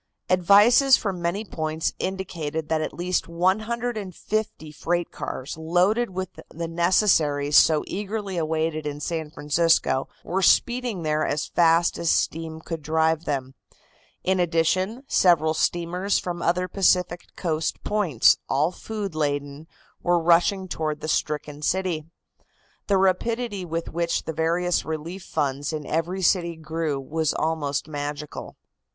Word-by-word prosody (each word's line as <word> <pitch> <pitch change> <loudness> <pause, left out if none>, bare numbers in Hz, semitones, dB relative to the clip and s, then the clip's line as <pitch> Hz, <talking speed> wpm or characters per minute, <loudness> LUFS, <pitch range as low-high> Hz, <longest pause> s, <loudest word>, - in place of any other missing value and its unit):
Advices 205 +9 +6
from 190 -4 -3
many 180 +6 -1
points 160 -3 -2
indicated 165 -5 -4
that 160 -1 +1
at 155 - -3
least 180 +1 -2
150 210 -1 -2
freight 175 +3 -2
cars 130 +2 -5
loaded 180 +9 +2
with 185 -1 -4 0.2
the 165 +1 -5
necessaries 165 -4 +2
so 155 +1 +6
eagerly 200 0 -4
awaited 160 -1 -1
in 145 0 -4
San 160 +1 -3
Francisco 150 -3 +1
were 190 +2 -1
speeding 240 0 +2
there 155 0 +1
as 145 0 -1
fast 170 0 +3
as 170 - 0
steam 160 0 0
could 165 -1 -5
drive 160 +1 +1
them. 135 -2 -3 0.7
In 190 0 +1
addition, 185 - +1
several 160 - +4
steamers 175 +4 0
from 175 -1 -4
other 180 +2 +1
Pacific 180 -2 +1
coast 160 -3 -2
points, 185 - +3
all 150 +5 +2
food 205 -1 -5
laden, 145 0 -2 0.3
were 175 0 +2
rushing 175 +3 +3
toward 155 -3 -3
the - - -4
stricken 150 -1 -2
city. 175 -2 -1 0.8
The 200 - +3
rapidity 200 +2 0
with 165 0 -4
which 170 0 -1
the 160 - -4
various 170 +2 +1
relief 160 +4 -5
funds 145 -4 -2
in 155 -2 -4
every 170 +6 -2
city 170 -2 +2
grew 160 -2 -3
was 155 +3 -1
almost 155 -3 -1
magical. 145 0 -6
170 Hz, 135 wpm, -24 LUFS, 155-185 Hz, 0.8 s, Advices